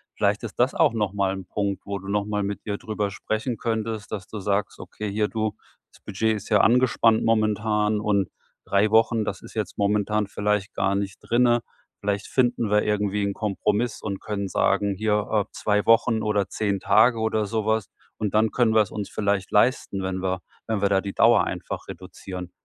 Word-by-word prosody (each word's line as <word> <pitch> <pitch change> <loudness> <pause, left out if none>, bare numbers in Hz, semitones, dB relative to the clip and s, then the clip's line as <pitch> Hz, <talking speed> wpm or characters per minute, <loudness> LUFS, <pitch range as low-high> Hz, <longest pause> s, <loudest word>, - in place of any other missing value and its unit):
Vielleicht - - +1
ist - - -6
das - - +3
auch - - +3
nochmal 100 -3 0
'n 95 -2 -7
Punkt, 100 0 -2
wo 100 -1 -4
du 95 - -11
nochmal 105 0 -1
mit 100 0 -4
ihr 100 -1 -2
darüber 105 -2 -3
sprechen 110 +4 -3
könntest, 110 -1 -3
dass 105 -3 -5
du 110 - -7
sagst: 100 +1 -1
„Okay, 105 -2 -6
hier, 105 +1 +1
du, 110 -1 -2 0.4
das - - -21
Budget 110 +2 0
ist 105 - -8
ja 105 -2 +4
angespannt 120 -1 +4
momentan 110 -1 +1
und 100 -3 +1 0.4
3 100 +2 +2
Wochen, 115 0 +3
das - - -4
ist - - -12
jetzt - - -4
momentan 105 +1 +1
vielleicht 105 0 -1
gar 100 +1 +1
nicht 100 -1 -3
drinnen. 120 0 +3 0.4
Vielleicht 100 0 -2
finden 120 -4 +1
wir 105 - +4
irgendwie 105 -1 0
'n 100 0 -1
Kompromiss 105 +2 -1
und 100 -2 -4
können 100 -2 -3
sagen: 100 0 +1
‚Hier, 105 0 0
äh, 105 -2 +2
2 105 -1 0
Wochen 115 0 +4
oder 105 -2 0
10 100 -3 -1
Tage 115 +4 +4
oder 110 -1 0
sowas.‘ 110 0 0 0.3
Und 105 -1 -2
dann 110 +1 +3
können 120 -3 +2
wir's 110 -3 +3
uns 105 -2 -5
vielleicht 100 -2 -1
leisten, 105 -3 +2
wenn 95 0 -3
wir 95 0 -1 0.3
wenn 110 -3 -1
wir 100 - +3
da 95 -1 +3
die 100 0 -5
Dauer - - +5
einfach - - -5
reduzieren. 90 -2 -8
105 Hz, 190 wpm, -24 LUFS, 100-110 Hz, 0.4 s, Dauer